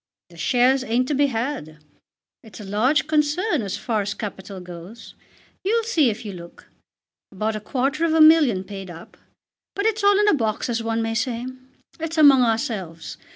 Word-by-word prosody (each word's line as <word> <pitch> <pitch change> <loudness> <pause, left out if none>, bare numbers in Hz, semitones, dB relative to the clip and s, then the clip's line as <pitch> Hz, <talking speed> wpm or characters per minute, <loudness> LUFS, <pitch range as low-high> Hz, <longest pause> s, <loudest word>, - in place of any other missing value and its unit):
The 170 - -16
shares 255 +6 +2
ain't 250 +1 0
to - - 0
be 285 +1 +3
had. 225 - -4 0.7
It's 220 -1 -13
a - - -8
large 220 +10 +1
concern 305 - +1
as 200 -3 -4
far 220 -3 -1
as 205 +2 -4
capital 195 -2 -7
goes. 180 +5 -11 0.5
You'll 455 +4 +1
see 325 - +2
if 225 +2 -6
you 205 - -5
look. 170 -1 -12 0.6
About 215 +3 -2
a - - -3
quarter 270 +7 -1
of 325 -1 +2
a - - +3
million 310 - +6
paid 195 -1 -8
up. 170 -1 -12 0.6
But 400 - -2
it's 440 -1 0
all 405 0 +5
in 420 - +3
a - - +5
box 225 -5 -1
as 230 -1 -1
one 225 0 -1
may 225 0 -2
say. 235 +1 -2 0.5
It's 325 0 -4
among 285 -4 +7
ourselves. 210 -8 -2
235 Hz, 185 wpm, -22 LUFS, 205-300 Hz, 0.7 s, among